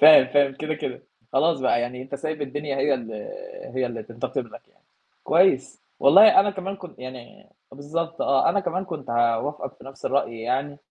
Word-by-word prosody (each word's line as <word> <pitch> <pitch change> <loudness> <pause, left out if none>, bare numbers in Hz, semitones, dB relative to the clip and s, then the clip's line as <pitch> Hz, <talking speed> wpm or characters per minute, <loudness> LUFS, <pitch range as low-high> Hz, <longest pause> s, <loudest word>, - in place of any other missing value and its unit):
فاهم، 150 -3 +9
فاهم، 140 +1 +2
كده، 155 +3 -3
كده 130 -4 -6 0.3
خلاص 155 +2 +2
بقى 130 -2 +2
يعني 125 +1 -4
أنت 135 +2 -8
سايب 155 0 -4
الدنيا 145 0 -4
هي 140 +1 +2
ال 115 -3 -6 0.6
هي - - 0
اللي - - -6
تنتقم - - -4
لك، - - -13 0.6
كويس 165 -6 +2 0.2
والله 195 +12 +8
أنا 205 +1 +1
كمان 195 0 -5
كنت 180 -3 -12
يعني 130 +11 -11 0.2
بالضبط، 165 +4 -4
آه، 135 -1 +3
أنا 200 - +1
كمان 185 0 -2
كنت 155 -9 -7
هاوافقك 120 +5 0
في - - -18
نَفْس 135 0 -12
الرأي 130 -4 -1
يعني. 135 +5 -2
145 Hz, 175 wpm, -24 LUFS, 130-165 Hz, 0.6 s, فاهم